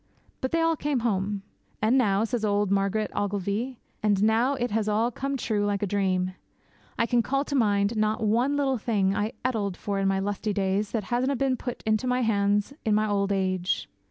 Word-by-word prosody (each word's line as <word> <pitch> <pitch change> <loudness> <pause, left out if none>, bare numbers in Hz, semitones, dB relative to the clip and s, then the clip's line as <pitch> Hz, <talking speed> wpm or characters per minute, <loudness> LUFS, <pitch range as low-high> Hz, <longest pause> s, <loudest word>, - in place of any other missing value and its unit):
But 260 - 0
they 330 - +2
all 330 0 +3
came 285 -4 -1
home. 200 -3 -1 0.4
'And 220 +4 +3
now,' 210 -5 +3
says 230 0 -2
old 205 -1 +1
Margaret 200 +2 +1
Ogilvy, 205 +5 -2 0.2
'and 205 -2 +2
now 230 +5 +3
it 245 -3 -2
has 215 0 0
all 225 +3 +1
come 275 +3 -3
true 215 -4 -1
like 205 0 0
a - - +3
dream. 185 -2 0 0.6
I - - +2
can 240 0 +2
call 275 +6 0
to 285 - -5
mind 205 -3 +2
not 215 +1 0
one 240 +7 +2
little 270 -3 +1
thing 200 -4 +1
I 210 +3 -1
ettled 205 -7 -1
for 200 -1 -2
in 195 - +1
my 195 0 +2
lusty 205 +2 -2
days 195 +1 0
that 225 -3 -2
hasna' 260 +3 +1
been 265 0 +1
put 245 0 -6
into 215 +3 +1
my 250 0 +1
hands 205 +1 +1
in 215 -2 +2
my 215 0 +2
auld 200 -1 0
age. 185 -2 0
215 Hz, 205 wpm, -26 LUFS, 200-245 Hz, 0.6 s, all